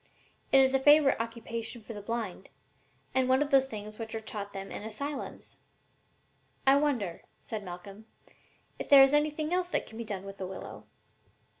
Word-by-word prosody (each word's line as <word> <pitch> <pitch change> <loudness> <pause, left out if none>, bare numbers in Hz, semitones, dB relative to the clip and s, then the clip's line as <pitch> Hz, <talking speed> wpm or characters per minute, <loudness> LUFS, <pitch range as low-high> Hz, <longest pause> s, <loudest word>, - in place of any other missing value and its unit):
It 270 - +7
is 265 0 +4
a 270 - +4
favorite 290 -2 +5
occupation 230 0 -5
for 225 +1 -9
the 205 - -7
blind, 215 -4 -4 0.6
and 260 -1 +2
one 260 +3 +4
of 290 - -7
the 270 -1 +7
things 215 -4 -7
which 225 -1 -5
are - - -2
taught 210 -2 -6
them 195 0 -7
in - - -5
asylums." 265 +7 -6 1.1
"I 270 +1 +7
wonder," 250 - 0 0.2
said 215 -2 -6
Malcolm, 195 +4 -10 0.7
"if - - -6
there 275 -1 +10
is 270 +1 +4
anything 305 +2 +1
else 360 0 0
that - - -1
can 220 - -11
be - - -3
done 200 -4 -5
with 195 0 -9
the 190 - -3
willow?" 190 - -9
230 Hz, 180 wpm, -30 LUFS, 205-270 Hz, 1.1 s, there